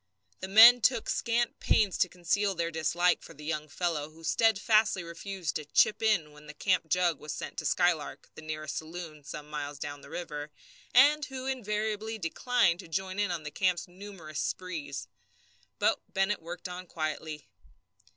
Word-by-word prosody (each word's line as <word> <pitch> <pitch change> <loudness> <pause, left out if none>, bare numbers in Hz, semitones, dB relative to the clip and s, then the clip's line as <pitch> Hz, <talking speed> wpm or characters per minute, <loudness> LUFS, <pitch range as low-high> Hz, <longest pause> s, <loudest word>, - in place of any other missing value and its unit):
The 190 - -5
men 230 +5 +9
took 235 -1 +2
scant 235 0 0
pains 205 -4 +2
to 180 - +3
conceal 190 +3 0
their 170 0 -1
dislike 170 +3 +2
for - - -13
the 150 +1 -11
young 155 -1 -2
fellow 155 -2 -2
who 160 +1 -17
steadfastly 215 -1 +3
refused 170 0 -4
to 155 - -8
"chip 150 +7 +3
in" 205 -9 +2
when 150 0 -15
the 150 - -10
camp 185 -1 +1
jug 175 -2 +2
was 150 - -6
sent - - -6
to - - -6
the - - +3
Skylark, 165 -6 0
the - - -11
nearest 155 -1 -5
saloon, 160 -2 -7
some 150 +1 -8
miles 145 -1 -5
down 145 0 -6
the - - -13
river, 150 -4 -5 0.4
and 290 +3 +6
who 260 -1 -7
invariably 220 -3 -2
declined 190 0 +1
to 185 - -9
join 190 +3 -3
in 175 -6 -1
the 150 - -6
camp's 180 +2 0
numerous 175 -5 -8
sprees. 155 -6 -4 0.7
But - - +2
Bennett 195 +1 0
worked 175 +3 -7
on 180 0 -8
quietly. 155 -3 -4
175 Hz, 170 wpm, -30 LUFS, 155-205 Hz, 0.7 s, men